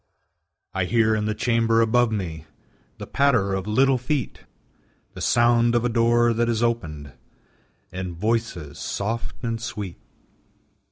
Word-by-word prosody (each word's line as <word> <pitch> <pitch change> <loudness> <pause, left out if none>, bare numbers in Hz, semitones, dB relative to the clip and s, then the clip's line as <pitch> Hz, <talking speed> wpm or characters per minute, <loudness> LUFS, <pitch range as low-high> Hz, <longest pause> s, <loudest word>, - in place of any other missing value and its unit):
I 95 -1 0
hear 110 +2 +2
in 105 -1 0
the 110 0 -1
chamber 115 0 +2
above 115 +1 +3
me 85 -7 -4 0.5
The - - -7
patter 115 -9 +2
of 95 +1 -3
little 130 +4 +3
feet, 130 0 -3 0.7
The - - -9
sound 120 0 +3
of 120 0 +2
a - - +2
door 120 0 +3
that 115 +1 0
is 115 0 0
opened, 75 - -2 0.8
And 90 -2 -5
voices 105 -8 -2
soft 115 +5 -4
and 115 -1 -2
sweet. 105 -7 -6
115 Hz, 135 wpm, -23 LUFS, 100-120 Hz, 0.8 s, above